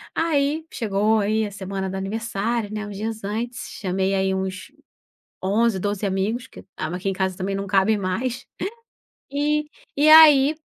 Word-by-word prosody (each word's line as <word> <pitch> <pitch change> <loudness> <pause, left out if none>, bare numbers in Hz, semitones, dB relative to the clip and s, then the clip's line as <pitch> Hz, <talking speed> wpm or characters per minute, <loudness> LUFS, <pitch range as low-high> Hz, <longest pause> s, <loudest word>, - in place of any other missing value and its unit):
Aí 310 -1 +1
chegou 215 0 +1
aí 215 +1 +1
a 205 - -6
semana 190 -1 -4
do 190 - -5
aniversário, 215 +2 -2
né 210 0 -4
uns 205 - -8
dias 220 +2 -4
antes, 235 +4 -4
chamei 190 0 0
aí 190 0 +1
uns 190 +5 -4 0.7
11, 205 +1 +1
12 205 0 -2
amigos 205 +6 -1
que - - -14
aqui 180 +5 -3
em - - +1
casa 190 -1 -1
também 195 +1 -2
não 200 0 -4
cabe 200 +2 +3
mais. 230 +7 -3 0.9
E 300 +1 +1 0.3
e 300 +2 +5
aí, 305 -2 +8
210 Hz, 155 wpm, -23 LUFS, 190-240 Hz, 0.9 s, aí